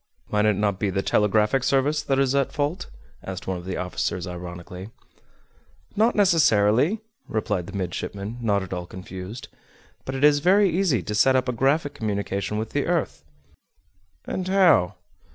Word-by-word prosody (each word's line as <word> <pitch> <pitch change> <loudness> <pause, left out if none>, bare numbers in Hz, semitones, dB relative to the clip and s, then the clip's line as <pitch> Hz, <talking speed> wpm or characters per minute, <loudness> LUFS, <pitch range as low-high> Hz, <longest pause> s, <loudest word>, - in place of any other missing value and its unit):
"Might 105 0 +2
it 105 -1 +3
not 100 -1 0
be 105 - 0
the 95 +1 -1
telegraphic 105 +4 +2
service 140 +3 +2
that 135 -2 0
is 135 -1 +2
at 140 -1 +1
fault?" 150 +5 -2 0.4
asked 95 -1 -6
one 95 -1 -3
of 85 - -11
the 95 - -4
officers 90 0 -2
ironically. 90 +2 -8 1.1
"Not 225 +3 +3
necessarily," 160 - +3 0.3
replied 105 -5 -2
the - - -6
midshipman, 100 +4 -4
not 100 -4 +1
at 95 - -7
all 90 -1 -5
confused. 95 +5 -8 0.6
"But 130 - -5
it 135 - -3
is 150 -1 +6
very 190 +4 +4
easy 170 - +1
to 105 - -4
set 130 +5 +4
up 130 0 +1
a - - +1
graphic 140 +5 +1
communication 100 -1 -3
with 110 +1 -4
the 145 - -1
earth." 165 - -1 1.0
"And 185 -1 -3
how?" 175 - +4
110 Hz, 165 wpm, -24 LUFS, 95-145 Hz, 1.1 s, is